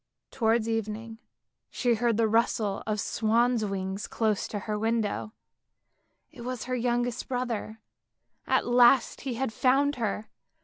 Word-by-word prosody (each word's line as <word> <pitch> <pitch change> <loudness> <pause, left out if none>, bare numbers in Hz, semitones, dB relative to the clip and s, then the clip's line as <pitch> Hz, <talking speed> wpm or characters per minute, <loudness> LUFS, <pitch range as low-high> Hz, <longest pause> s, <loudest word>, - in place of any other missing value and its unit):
Towards 225 -2 +1
evening 225 0 -3 0.5
she 245 -2 +1
heard 230 -1 +1
the 225 -1 +3
rustle 215 -2 +1
of 215 -1 -1
swans' 230 +2 +1
wings 195 0 -3
close 215 -3 0
to 210 - -4
her 210 +2 -3
window; 220 -1 -1 1.0
it 280 -6 -12
was 250 -1 -4
her 255 - -4
youngest 245 0 -1
brother, 240 -4 -3 0.7
at - - +2
last 245 0 +4
he 260 -3 -3
had 250 -2 -2
found 275 +4 +2
her. 215 -2 -2
230 Hz, 135 wpm, -28 LUFS, 215-245 Hz, 1.0 s, last